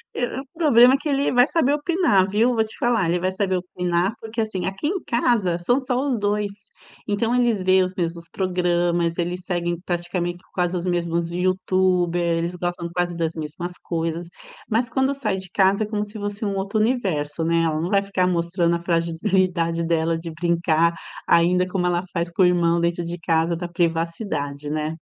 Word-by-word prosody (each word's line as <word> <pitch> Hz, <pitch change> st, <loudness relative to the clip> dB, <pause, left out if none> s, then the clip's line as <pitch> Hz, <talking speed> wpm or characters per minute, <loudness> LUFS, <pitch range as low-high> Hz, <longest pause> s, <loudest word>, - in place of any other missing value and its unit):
É 245 Hz, -, -2 dB
é 255 Hz, +2 st, -5 dB
o -, -, -13 dB
problema 265 Hz, -6 st, +6 dB
que 305 Hz, -, -5 dB
ele 280 Hz, 0 st, +1 dB
vai 245 Hz, 0 st, +5 dB
saber 310 Hz, -4 st, +2 dB
opinar, 295 Hz, -, +2 dB
viu? 225 Hz, +5 st, +2 dB
Vou 225 Hz, -, +2 dB
te 220 Hz, -, -8 dB
falar, 235 Hz, -7 st, +1 dB
ele 175 Hz, +1 st, +1 dB
vai 185 Hz, +1 st, 0 dB
saber 190 Hz, -1 st, 0 dB
opinar 180 Hz, +1 st, -1 dB
porque, 225 Hz, +1 st, -4 dB
assim, 195 Hz, -5 st, -3 dB
aqui 195 Hz, +10 st, -3 dB
em 375 Hz, +1 st, -1 dB
casa 230 Hz, -7 st, +1 dB
são 245 Hz, +10 st, +2 dB
só 255 Hz, -2 st, -1 dB
os 270 Hz, -4 st, 0 dB
2. 205 Hz, 0 st, 0 dB, 0.6 s
Então 225 Hz, +3 st, 0 dB
eles 240 Hz, -5 st, +2 dB
veem 185 Hz, 0 st, +4 dB
os 185 Hz, 0 st, -3 dB
mesmos 170 Hz, -1 st, -3 dB
programas, 175 Hz, -2 st, 0 dB
eles 175 Hz, +1 st, -2 dB
seguem 175 Hz, -2 st, -2 dB
praticamente 175 Hz, 0 st, -3 dB
quase 180 Hz, 0 st, 0 dB
os 175 Hz, 0 st, -3 dB
mesmos 170 Hz, -1 st, -1 dB
youtubers, 180 Hz, -1 st, +1 dB
eles 170 Hz, +2 st, -3 dB
gostam 175 Hz, -1 st, -3 dB
quase 175 Hz, 0 st, -1 dB
das 165 Hz, -1 st, -1 dB
mesmas 160 Hz, +3 st, -5 dB
coisas, 165 Hz, 0 st, -3 dB, 0.4 s
mas 235 Hz, +3 st, +1 dB
quando 265 Hz, +2 st, +1 dB
sai 235 Hz, -8 st, -2 dB
de 185 Hz, -1 st, -7 dB
casa 195 Hz, +2 st, +3 dB
é -, -, -3 dB
como 210 Hz, -1 st, -2 dB
se 210 Hz, +1 st, -10 dB
fosse 205 Hz, +1 st, -4 dB
um 200 Hz, -, -1 dB
outro 195 Hz, +2 st, -1 dB
universo, 185 Hz, -, 0 dB
né, 165 Hz, 0 st, +2 dB
ela 155 Hz, -1 st, 0 dB
não 170 Hz, +3 st, -2 dB
vai 200 Hz, 0 st, +3 dB
ficar 195 Hz, -2 st, 0 dB
mostrando 170 Hz, 0 st, +1 dB
a -, -, -2 dB
fragilidade 170 Hz, 0 st, 0 dB
dela 165 Hz, 0 st, +1 dB
de 165 Hz, 0 st, -6 dB
brincar 170 Hz, 0 st, +1 dB, 0.3 s
ainda 180 Hz, +2 st, +4 dB
como 185 Hz, -1 st, -1 dB
ela 175 Hz, 0 st, +1 dB
faz 170 Hz, -1 st, -1 dB
com 180 Hz, -, 0 dB
o -, -, +7 dB
irmão 170 Hz, -1 st, +3 dB
dentro 170 Hz, 0 st, 0 dB
de 175 Hz, +1 st, -5 dB
casa 165 Hz, 0 st, +1 dB
da 175 Hz, +1 st, -4 dB
privacidade, 165 Hz, -4 st, -2 dB
né. 155 Hz, +1 st, -2 dB
180 Hz, 195 wpm, -23 LUFS, 170-205 Hz, 0.6 s, o